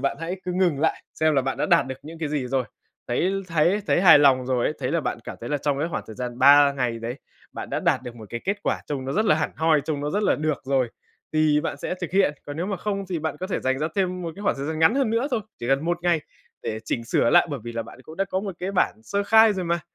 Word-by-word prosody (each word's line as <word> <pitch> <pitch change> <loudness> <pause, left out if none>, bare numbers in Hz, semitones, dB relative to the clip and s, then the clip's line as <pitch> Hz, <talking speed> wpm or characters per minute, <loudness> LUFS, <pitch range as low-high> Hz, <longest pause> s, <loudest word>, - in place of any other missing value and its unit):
bạn 140 - -1
hãy 170 +3 -3
cứ 180 - -2
ngừng 175 -6 +1
lại, 160 - 0
xem 155 -1 +2
là 135 - +3
bạn 135 0 -2
đã - - 0
đạt - - +4
được 130 - -4
những 160 +3 -10
cái 160 -2 -2
gì 145 -3 -2
rồi. 130 0 0 0.4
Thấy 170 +10 +1 0.2
thấy 170 +5 +2
thấy - - +3
hài 175 -5 +8
lòng 130 -3 +4
rồi 125 -2 0
ấy, - - 0
thấy 125 - -2
là 170 - +2
bạn - - -3
cảm - - -7
thấy 120 - -6
là 150 - 0
trong 140 0 -1
cái 160 +3 -1
khoảng 150 - -3
thời 110 - -10
gian 125 -1 -5
3 140 +1 +7
ngày 125 -4 -2
đấy, 115 +2 -5 0.4
bạn - - -7
đã - - -1
đạt - - +1
được 120 -1 -8
một 110 -2 -10
cái 120 - -4
kết 200 +2 0
quả - - -1
trông 140 -3 -4
nó 135 - -3
rất 215 - +1
là 200 - +4
hẳn 155 - -1
hoi, 160 -1 +3
trông 150 -3 -2
nó 145 +1 -2
rất 205 +5 0
là - - +3
được 155 -1 -2
rồi 130 -2 +1 0.4
thì 155 -1 +3
bạn - - -3
sẽ 180 - -3
thực 175 - -4
hiện. 190 -6 +3
Còn 145 - -6
nếu 170 +3 -2
mà 195 -1 -2
không 200 0 -3
thì 175 - -1
bạn 155 -1 -3
có 185 - -2
thể 190 - -2
dành 130 0 0
ra 155 +2 -1
thêm 185 -2 0
một 165 -1 -4
cái 200 - -8
khoảng 200 - +1
thời 140 +1 -4
gian 160 0 -3
ngắn 160 +8 +4
hơn 270 -5 +1
nữa 230 +4 +1
thôi, 240 -4 0 0.2
chỉ 120 - -4
cần 135 +3 +2
1 175 +1 0
ngày 175 -2 +2 0.4
để 110 - -3
chỉnh 115 +1 -2
sửa 115 - +2
lại, - - +6
bởi 140 -4 -4
vì 120 - -5
là 115 0 -3
bạn 120 +3 -13
cũng 160 +4 -12
đã 195 - +1
có 190 0 -2
một 195 -2 -5
cái 185 +2 -3
bản 190 - +2
sơ 200 - -1
khai 220 +1 +6
rồi 190 -2 -3
mà. 170 0 0
155 Hz, 310 wpm, -24 LUFS, 135-180 Hz, 0.4 s, hài